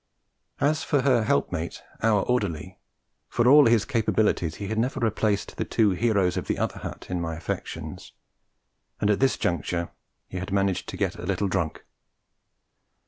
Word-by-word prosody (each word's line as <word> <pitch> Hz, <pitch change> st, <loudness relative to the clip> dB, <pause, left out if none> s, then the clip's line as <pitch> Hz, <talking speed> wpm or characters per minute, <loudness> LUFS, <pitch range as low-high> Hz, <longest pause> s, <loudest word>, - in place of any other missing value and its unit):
As 150 Hz, +2 st, +2 dB
for 145 Hz, -, +2 dB
her 125 Hz, -5 st, +3 dB
helpmate, 80 Hz, 0 st, -1 dB, 0.2 s
our 110 Hz, -3 st, +3 dB
orderly, 100 Hz, -12 st, -2 dB, 0.5 s
for 120 Hz, 0 st, +2 dB
all 145 Hz, +1 st, +8 dB
his 115 Hz, -2 st, +4 dB
capabilities 110 Hz, -, +1 dB
he 100 Hz, -, -5 dB
had 110 Hz, +1 st, -1 dB
never 125 Hz, +3 st, 0 dB
replaced 110 Hz, -3 st, 0 dB
the -, -, 0 dB
two 110 Hz, -3 st, +2 dB
heroes 95 Hz, -3 st, +1 dB
of -, -, -3 dB
the -, -, 0 dB
other -, -, -2 dB
hut -, -, -7 dB
in 90 Hz, -1 st, -1 dB
my 80 Hz, -1 st, -3 dB
affections; 80 Hz, -, -6 dB, 0.9 s
and 105 Hz, -, +2 dB
at 100 Hz, -, +1 dB
this 135 Hz, -1 st, +3 dB
juncture 85 Hz, +1 st, -1 dB, 0.4 s
he 95 Hz, -, -6 dB
had 95 Hz, +2 st, -5 dB
managed 100 Hz, -1 st, 0 dB
to -, -, -6 dB
get -, -, -1 dB
a 90 Hz, -, -7 dB
little 100 Hz, +1 st, 0 dB
drunk. 85 Hz, -4 st, -2 dB
105 Hz, 165 wpm, -26 LUFS, 90-115 Hz, 0.9 s, all